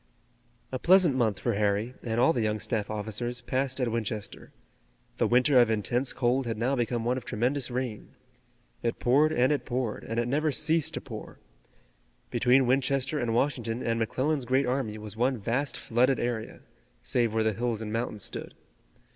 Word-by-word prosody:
A 130 Hz, -, -3 dB
pleasant 180 Hz, -4 st, +5 dB
month 110 Hz, -6 st, +1 dB
for 120 Hz, -, -1 dB
Harry, 105 Hz, +3 st, 0 dB
and 115 Hz, -1 st, -2 dB
all 130 Hz, +7 st, +5 dB
the 120 Hz, -, -1 dB
young 110 Hz, 0 st, 0 dB
staff 105 Hz, -1 st, -2 dB
officers 110 Hz, +3 st, -3 dB
passed 130 Hz, 0 st, -1 dB
at 125 Hz, -3 st, 0 dB
Winchester. 110 Hz, -2 st, -4 dB, 0.7 s
The -, -, +2 dB
winter 125 Hz, +2 st, +5 dB
of 120 Hz, -, +3 dB
intense 120 Hz, +4 st, 0 dB
cold 125 Hz, +1 st, 0 dB
had 115 Hz, -2 st, -2 dB
now 125 Hz, +5 st, +1 dB
become 120 Hz, -2 st, -1 dB
one 125 Hz, +2 st, +1 dB
of 130 Hz, -, -5 dB
tremendous 125 Hz, +4 st, 0 dB
rain. 125 Hz, -4 st, -4 dB, 0.7 s
It 115 Hz, -, -1 dB
poured 145 Hz, +6 st, +3 dB
and 130 Hz, -3 st, +3 dB
it 145 Hz, -, 0 dB
poured, 125 Hz, -3 st, -3 dB
and 115 Hz, +1 st, -3 dB
it 120 Hz, -, 0 dB
never 150 Hz, +4 st, +1 dB
ceased 155 Hz, +1 st, +1 dB
to -, -, -4 dB
pour. -, -, -9 dB, 0.9 s
Between 130 Hz, +1 st, +4 dB
Winchester 135 Hz, +3 st, +1 dB
and 115 Hz, -3 st, -1 dB
Washington 120 Hz, -3 st, -1 dB
and 115 Hz, 0 st, 0 dB
McClellan's 130 Hz, +5 st, 0 dB
great 130 Hz, +3 st, +2 dB
army 125 Hz, -4 st, -1 dB
was 105 Hz, -1 st, -6 dB
one 125 Hz, +3 st, +1 dB
vast 125 Hz, +6 st, -1 dB
flooded 125 Hz, +3 st, +2 dB
area, 120 Hz, -2 st, -3 dB, 0.4 s
save 120 Hz, -3 st, +1 dB
where 110 Hz, 0 st, +1 dB
the 110 Hz, 0 st, +1 dB
hills 115 Hz, +1 st, -2 dB
and 110 Hz, -1 st, -5 dB
mountains 115 Hz, -3 st, -3 dB
stood. -, -, -5 dB
120 Hz, 180 wpm, -28 LUFS, 115-130 Hz, 0.9 s, pleasant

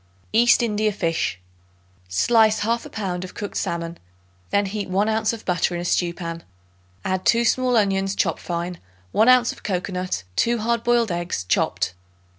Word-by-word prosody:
East 240 Hz, +2 st, +5 dB
India 215 Hz, -1 st, +1 dB
Fish. 165 Hz, -, -1 dB, 0.7 s
Slice 220 Hz, -, +3 dB
1/2 230 Hz, +2 st, -1 dB
pound 185 Hz, -4 st, -3 dB
of 185 Hz, -, -9 dB
cooked 205 Hz, -, -6 dB
salmon; 170 Hz, 0 st, -3 dB, 0.5 s
then 200 Hz, 0 st, +2 dB
heat 200 Hz, 0 st, -4 dB
1 195 Hz, +3 st, +1 dB
ounce 220 Hz, 0 st, +1 dB
of 230 Hz, -2 st, -8 dB
butter 175 Hz, -1 st, +1 dB
in 175 Hz, -, -3 dB
a -, -, -5 dB
stew 175 Hz, 0 st, +1 dB
pan; 170 Hz, -1 st, -6 dB, 0.6 s
add 185 Hz, 0 st, -1 dB
2 235 Hz, 0 st, +3 dB
small 250 Hz, +1 st, +2 dB
onions 195 Hz, -2 st, +1 dB
chopped 165 Hz, -4 st, 0 dB
fine, 175 Hz, 0 st, -4 dB, 0.3 s
1 220 Hz, +3 st, +4 dB
ounce 250 Hz, -1 st, +5 dB
of -, -, -13 dB
cocoanut, 185 Hz, -, -2 dB
2 235 Hz, 0 st, +2 dB
hard 235 Hz, +1 st, 0 dB
boiled 240 Hz, -3 st, +2 dB
eggs 175 Hz, -, -2 dB
chopped. 90 Hz, 0 st, 0 dB
200 Hz, 165 wpm, -23 LUFS, 175-225 Hz, 0.7 s, East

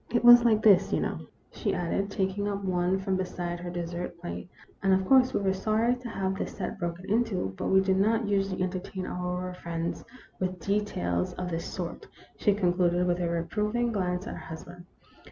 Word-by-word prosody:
It 240 Hz, -, +1 dB
was 240 Hz, 0 st, +10 dB
like 220 Hz, -3 st, +3 dB
this, 195 Hz, -3 st, +6 dB
you -, -, +2 dB
know," -, -, -2 dB, 0.3 s
she -, -, -2 dB
added, 180 Hz, +3 st, -1 dB
taking 195 Hz, +1 st, -1 dB
up 200 Hz, -1 st, -3 dB
one 180 Hz, 0 st, +1 dB
from 190 Hz, 0 st, -1 dB
beside 175 Hz, -2 st, -3 dB
her 175 Hz, 0 st, -5 dB
dessert 175 Hz, 0 st, -5 dB
plate, 175 Hz, 0 st, -6 dB, 0.2 s
" -, -, -31 dB
and, 195 Hz, -1 st, +4 dB
of 190 Hz, 0 st, 0 dB
course, 255 Hz, +3 st, +5 dB
we -, -, 0 dB
were 190 Hz, -1 st, +2 dB
sorry 215 Hz, +5 st, +1 dB
to 245 Hz, -1 st, -8 dB
have 190 Hz, -3 st, -1 dB
the 190 Hz, -, -3 dB
set -, -, -5 dB
broken 175 Hz, 0 st, -4 dB
into; 205 Hz, -, 0 dB
but -, -, -3 dB
we 190 Hz, 0 st, +5 dB
do 190 Hz, 0 st, +2 dB
not 220 Hz, +3 st, +2 dB
usually 195 Hz, -2 st, 0 dB
entertain 185 Hz, 0 st, -4 dB
our 180 Hz, 0 st, -3 dB
friends 170 Hz, -1 st, -4 dB, 0.4 s
with 185 Hz, -1 st, -2 dB
details 165 Hz, -, -1 dB
of 180 Hz, -1 st, -4 dB
this 165 Hz, 0 st, -3 dB
sort," 175 Hz, -2 st, -5 dB, 0.3 s
she 205 Hz, -, +2 dB
concluded, 180 Hz, -2 st, +2 dB
with 175 Hz, 0 st, +1 dB
a 175 Hz, -1 st, 0 dB
reproving 210 Hz, +8 st, 0 dB
glance 180 Hz, -3 st, -1 dB
at -, -, -5 dB
her -, -, -7 dB
husband. 175 Hz, +2 st, -10 dB
190 Hz, 200 wpm, -28 LUFS, 175-205 Hz, 0.4 s, was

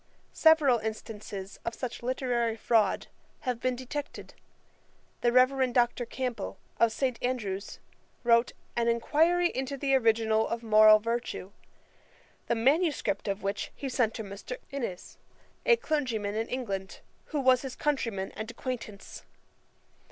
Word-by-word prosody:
Several 305 Hz, -7 st, +5 dB
instances 210 Hz, -2 st, -6 dB
of 230 Hz, -, -3 dB
such 250 Hz, -3 st, -5 dB
literary 240 Hz, -2 st, 0 dB
fraud 225 Hz, -1 st, +2 dB, 0.4 s
have 250 Hz, -4 st, -2 dB
been 255 Hz, 0 st, 0 dB
detected. 265 Hz, +3 st, -6 dB, 0.9 s
The 240 Hz, -, +3 dB
Reverend 255 Hz, 0 st, +3 dB
Dr. 240 Hz, -1 st, +2 dB
Campbell, 240 Hz, -7 st, -4 dB, 0.2 s
of 230 Hz, -1 st, +4 dB
St. 255 Hz, -1 st, -1 dB
Andrew's, 210 Hz, -6 st, -3 dB, 0.5 s
wrote 235 Hz, 0 st, +4 dB, 0.2 s
An 235 Hz, 0 st, +1 dB
Enquiry 320 Hz, +9 st, +3 dB
into 265 Hz, 0 st, -3 dB
the 275 Hz, 0 st, 0 dB
original 225 Hz, -3 st, +3 dB
of 230 Hz, 0 st, -3 dB
Moral 215 Hz, -1 st, +7 dB
Virtue, 230 Hz, -3 st, -3 dB, 1.0 s
the 235 Hz, -, +1 dB
manuscript 265 Hz, -, +1 dB
of 200 Hz, 0 st, -2 dB
which 200 Hz, +1 st, -2 dB
he 275 Hz, -, -4 dB
sent 245 Hz, -4 st, +1 dB
to 220 Hz, -, -4 dB
Mr. 200 Hz, -, -7 dB
Innes, 240 Hz, -10 st, -5 dB, 0.5 s
a 480 Hz, -, +7 dB
clergyman 250 Hz, -, -1 dB
in 225 Hz, +2 st, -2 dB
England, 200 Hz, -7 st, -4 dB, 0.2 s
who 300 Hz, -, -3 dB
was 260 Hz, -2 st, +4 dB
his 265 Hz, -2 st, -6 dB
countryman 230 Hz, -10 st, -1 dB
and 220 Hz, +1 st, -6 dB
acquaintance. 235 Hz, -4 st, -6 dB
235 Hz, 130 wpm, -29 LUFS, 220-260 Hz, 1.0 s, Moral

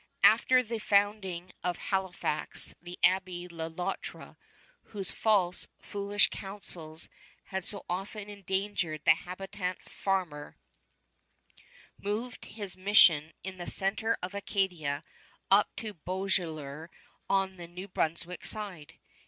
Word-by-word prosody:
After 255 Hz, +3 st, +7 dB
the 230 Hz, -1 st, -3 dB
founding 200 Hz, -4 st, +1 dB
of 180 Hz, -1 st, 0 dB
Halifax 185 Hz, -5 st, -1 dB
the 175 Hz, +1 st, -8 dB
Abbé 180 Hz, -1 st, +2 dB
Le 165 Hz, -1 st, -4 dB
Loutre, 175 Hz, +2 st, -5 dB, 0.5 s
whose 195 Hz, -3 st, -2 dB
false, 195 Hz, -5 st, +3 dB
foolish 200 Hz, 0 st, +1 dB
counsels 170 Hz, -5 st, -7 dB, 0.4 s
had 190 Hz, -1 st, -2 dB
so 200 Hz, +2 st, -3 dB
often 200 Hz, +3 st, -4 dB
endangered 190 Hz, -5 st, -2 dB
the 160 Hz, -, +9 dB
habitant 185 Hz, +1 st, -4 dB
farmer, 180 Hz, -7 st, -2 dB, 1.4 s
moved 220 Hz, +5 st, -3 dB
from -, -, -13 dB
his 205 Hz, -4 st, -3 dB
mission 180 Hz, -5 st, +6 dB
in 190 Hz, -1 st, -5 dB
the 175 Hz, -, -3 dB
center 215 Hz, +4 st, +2 dB
of 180 Hz, +2 st, -3 dB
Acadia 180 Hz, -8 st, -1 dB, 0.5 s
up 200 Hz, +2 st, +6 dB
to 215 Hz, -2 st, -4 dB
Beauséjour 165 Hz, -4 st, -2 dB, 0.4 s
on 195 Hz, -1 st, +2 dB
the 170 Hz, -1 st, -8 dB
New 180 Hz, +3 st, -8 dB
Brunswick 170 Hz, 0 st, -1 dB
side. 195 Hz, -8 st, -2 dB
190 Hz, 115 wpm, -31 LUFS, 175-200 Hz, 1.4 s, the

